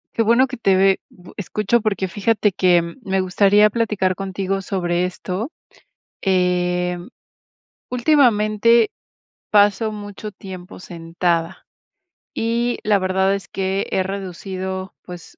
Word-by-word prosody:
Qué 230 - +2
bueno 235 +4 +4
que 255 - -7
te 195 -4 +3
ve 195 0 +4
bu 180 -1 -16
escucho 210 +5 0
porque 200 -3 -1
fíjate 210 +2 +1
que, 180 -1 +3
eh, - - +4 0.2
me 190 -2 0
gustaría 200 +3 +4
platicar 210 -4 0
contigo 195 0 -3
sobre 180 -2 -1
esto. 185 - -4 0.7
Em, 180 0 0 0.8
ultimamente 235 -4 +3 0.6
paso 205 +1 +3
mucho 205 0 -7
tiempo 185 -1 -10
sentada 170 0 -2 0.7
y 235 +2 0
la 210 -1 +3
verdad 190 +1 +1
es 195 -3 -7
que 195 0 -2
he 190 - +1
reducido, 190 0 -5
pues, 175 -2 -11
195 Hz, 120 wpm, -20 LUFS, 185-210 Hz, 0.8 s, bueno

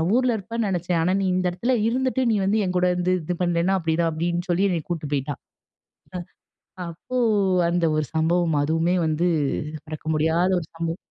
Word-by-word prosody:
ஊர்ல 250 -2 +2
இருப்பேன்னு 225 +1 -3
நினச்சேன். 175 -2 0
ஆனா 180 +3 +2
நீ - - 0
இந்த 185 0 0
இடத்துல 235 +9 -1
இருந்துட்டு 260 +2 0
நீ - - +2
வந்து 210 +3 +2
என்கூட 180 0 +1
வந்து 180 +1 +1
இது 180 +3 -2
பண்ணலன்னா" 175 +2 +2
அப்டிதான். 165 0 +1
அப்டின்னு 175 +3 -2
சொல்லி 175 +3 +2
என்ன 175 -3 0
கூட்டு 155 -4 -3
போய்ட்டா. 140 +1 -1 1.5
அப்போ 170 +10 -6 0.5
அந்த 175 0 +1
ஒரு 155 - 0
சம்பவம் 160 -1 +2
அதுவுமே 165 +3 +1
வந்து 160 +2 0 0.6
மறக்க 155 0 -8
முடியாத 160 +4 +2
ஒரு 160 - -8
சம்பவம். 165 0 -3
175 Hz, 160 wpm, -24 LUFS, 160-185 Hz, 1.5 s, ஊர்ல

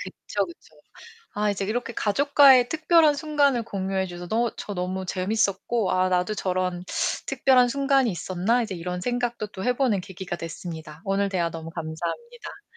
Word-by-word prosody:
그쵸, - - -3
그쵸. 345 - -15 0.6
아 210 0 +1
이제 200 -1 -2
이렇게 230 +4 -2
가족과의 265 +3 +5
특별한 315 -1 +4
순간을 285 -5 +1
공유해 190 -2 -2
주셔 175 -1 -8
너 230 +2 +1
저 205 - -6
너무 185 +1 -3
재밌었고 200 +2 0
'아, 185 0 +2
나도 180 +3 +1
저런 185 -2 -2 0.4
특별한 255 -2 +4
순간이 275 0 +2
있었나?' 185 +7 0
이제 205 -5 -4
이런 180 +1 -4
생각도 240 0 -2
또 190 -2 -7
해 250 - +3
보는 240 -8 +2
계기가 185 -1 -6
됐습니다. 160 -2 -8
오늘 200 0 +1
대화 175 -3 -1
너무 165 0 -7
감사합니다. 170 - -6
200 Hz, 355 characters per minute, -25 LUFS, 180-245 Hz, 0.6 s, 가족과의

